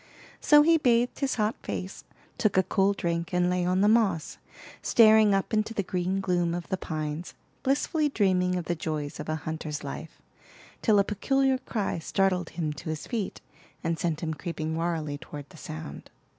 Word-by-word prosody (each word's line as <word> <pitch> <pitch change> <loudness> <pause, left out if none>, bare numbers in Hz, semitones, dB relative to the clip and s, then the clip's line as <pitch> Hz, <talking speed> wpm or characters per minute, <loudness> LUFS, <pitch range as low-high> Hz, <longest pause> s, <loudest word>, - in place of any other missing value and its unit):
So 295 0 +6
he 330 +1 +5
bathed 245 -3 +2
his 275 -2 0
hot 215 0 +1
face, 190 +2 -5 0.3
took 215 -3 +2
a 190 - +5
cool 195 +2 +2
drink, 170 -1 -2
and 180 0 +2
lay 180 0 +1
on 185 +1 +1
the 205 - +5
moss, 210 -8 +2 0.4
staring 215 -3 +6
up 195 +3 -1
into 215 +1 0
the 200 - 0
green 185 +1 -1
gloom 175 -2 0
of 175 -1 -5
the 190 - +1
pines, 155 -1 -5 0.3
blissfully 295 +3 +1
dreaming 185 -6 +2
of 175 -2 -3
the 175 - 0
joys 155 -3 -4
of - - -6
a 155 - 0
hunter's 155 -1 -5
life, 145 +3 -7 0.6
till 215 -3 +4
a 200 - +5
peculiar 265 +6 +1
cry 210 -9 -2
startled 185 0 0
him 155 -3 -1
to 150 - -8
his 155 -1 -4
feet, 225 -5 -3 0.4
and 165 -1 -1
sent 165 -2 -1
him 160 -1 -1
creeping 160 -1 -4
warily 160 -3 -2
toward 145 -1 -9
the - - -15
sound. 155 -2 -8
180 Hz, 185 wpm, -27 LUFS, 160-215 Hz, 0.6 s, So